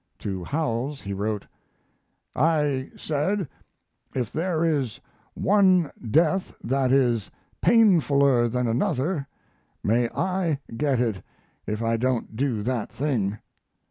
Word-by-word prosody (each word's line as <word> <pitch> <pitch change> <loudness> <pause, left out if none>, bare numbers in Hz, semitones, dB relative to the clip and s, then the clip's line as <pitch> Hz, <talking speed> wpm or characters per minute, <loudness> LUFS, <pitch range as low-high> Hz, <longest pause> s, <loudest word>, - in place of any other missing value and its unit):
To 95 -3 -4
Howells 140 - -2
he 100 - -5
wrote: 105 +1 -2 0.9
I 145 -3 +1
said, 165 +5 -1 0.7
"if 125 -5 -2
there 165 0 0
is 140 -8 0 0.4
one 185 -5 +3 0.2
death 165 - +2
that 130 +1 +1
is 120 -6 +2 0.3
painfuler 140 - +4
than 125 +1 0
another, 135 +6 0 0.6
may 115 +2 +2
I 185 -4 0 0.2
get 140 -1 +1
it 110 -7 0 0.5
if 105 +2 -2
I 115 0 +1
don't 125 -2 -1
do 120 -4 -1
that 120 -2 -2
thing." 115 -8 -1
135 Hz, 110 wpm, -25 LUFS, 115-160 Hz, 0.9 s, painfuler